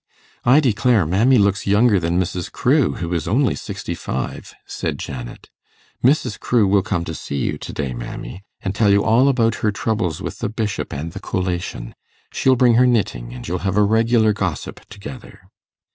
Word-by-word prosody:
'I 130 +5 +6
declare 120 - +2
mammy 110 +11 +3
looks 100 -1 +1
younger 105 +1 +4
than 85 +1 0
Mrs. 90 -1 -3
Crewe, 70 - +2
who 85 0 -4
is 80 -3 -2
only 120 +4 +2
sixty - - -5
five,' 65 - -5
said - - -4
Janet. 60 -3 -8 0.5
'Mrs. 125 -4 +2
Crewe 115 -5 +2
will 100 0 +3
come 90 -3 -2
to 80 - -5
see 70 - -6
you 70 - -2
to - - -7
day, 70 -4 -3
mammy, - - -7 0.2
and 95 - -3
tell 105 0 +2
you 100 0 +4
all 115 +5 +4
about 115 -4 +2
her 105 - +2
troubles 100 -6 -2
with - - -6
the 115 - -2
Bishop 110 -2 -3
and 80 +4 -5
the 95 - -7
collation. 90 -11 -3 0.4
She'll 130 -1 +3
bring 125 -1 +4
her 125 - +5
knitting, 75 - 0
and - - -8
you'll 90 +2 -2
have 95 +1 -1
a 105 - +5
regular 110 +1 +3
gossip 90 -8 -4
together. 110 +1 -10
100 Hz, 185 wpm, -20 LUFS, 85-115 Hz, 0.5 s, I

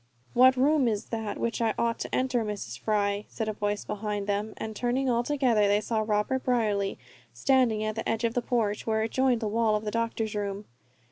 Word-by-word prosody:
"What 255 +1 +6
room 280 0 +3
is 215 -1 -2
that 220 -3 -3
which 235 0 -2
I 225 -2 +1
ought 230 0 0
to - - -3
enter, 255 -2 +1
Mrs. 200 - -5
Fry?" 205 +1 0
said 220 - -4
a 215 - -1
voice 205 0 -2
behind 210 -1 -3
them, 205 +1 -2
and 220 -1 -5
turning, 250 +3 0
all 235 0 +2
together, 240 -6 +2
they 205 +1 +3
saw 220 +1 -1
Robert 215 +5 0
Brierly 210 -6 0 0.4
standing 250 -6 +2
at 215 0 -1
the 225 - -3
edge 225 +1 -1
of 230 -1 +1
the 245 - 0
porch 225 -5 -1
where 220 0 +1
it 225 - -3
joined 260 -3 +2
the 220 - -1
wall 220 0 +2
of 210 +1 -3
the 210 - -2
doctor's 230 -1 -1
room. 205 0 -3
220 Hz, 215 wpm, -28 LUFS, 210-240 Hz, 0.4 s, What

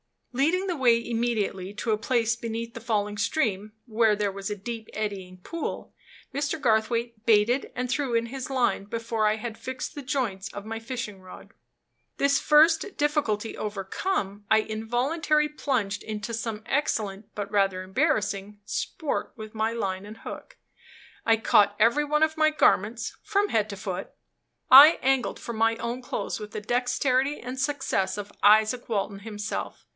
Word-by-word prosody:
Leading 325 +9 +2
the 355 -3 -1
way 235 -3 +3
immediately 220 -5 -1
to 220 +1 -2
a 215 - +2
place 230 0 +1
beneath 230 0 -5
the - - -7
falling 210 -2 -1
stream, 215 -3 -1
where 220 -2 +3
there 205 -1 -1
was 195 +1 -5
a 210 - -2
deep, 220 +2 -6
eddying 195 -4 -4
pool, 335 - -5 0.4
Mr. 290 +3 -1
Garthwaite 230 -2 0
baited 230 +4 +3
and 250 0 -2
threw 265 -3 0
in 230 0 +1
his 265 +2 -6
line 250 -6 +1
before 225 0 -1
I 210 - +2
had 220 0 -6
fixed 260 -1 -5
the 290 - -6
joints 250 -8 -2
of 205 0 -7
my 225 +1 -4
fishing 225 -4 -5
rod. 185 0 -13 0.7
This 280 0 +3
first 320 +5 +4
difficulty 285 -8 0
overcome, 205 - -3
I 220 0 +5
involuntarily 260 +8 0
plunged 240 -9 -1
into 215 +1 -5
some 220 -1 -4
excellent, 210 -8 -1
but 200 -1 -4
rather 195 -3 +1
embarrassing, 205 - -1
sport 310 - -3
with 215 -2 -9
my 220 0 0
line 195 -4 -3
and 215 +2 -10
hook. - - -9 0.7
I 225 -1 +5
caught 205 -2 +4
every 235 +7 +3
one 300 +1 +2
of 315 0 +1
my 310 0 +5
garments, 235 -6 +1
from 405 0 +1
head 215 -1 +1
to 200 - -5
foot; 190 -1 -5 0.6
I 285 +5 +11
angled 265 -1 +1
for 235 - -6
my 225 +1 +2
own 235 +2 -4
clothes 250 - -4
with 210 -1 -8
the 215 - -5
dexterity 255 +4 +1
and 255 +2 -6
success 265 -9 -1
of 205 0 -6
Izaak 220 +4 +5
Walton 200 -2 -1
himself. 210 0 -5
225 Hz, 160 wpm, -26 LUFS, 210-260 Hz, 0.7 s, I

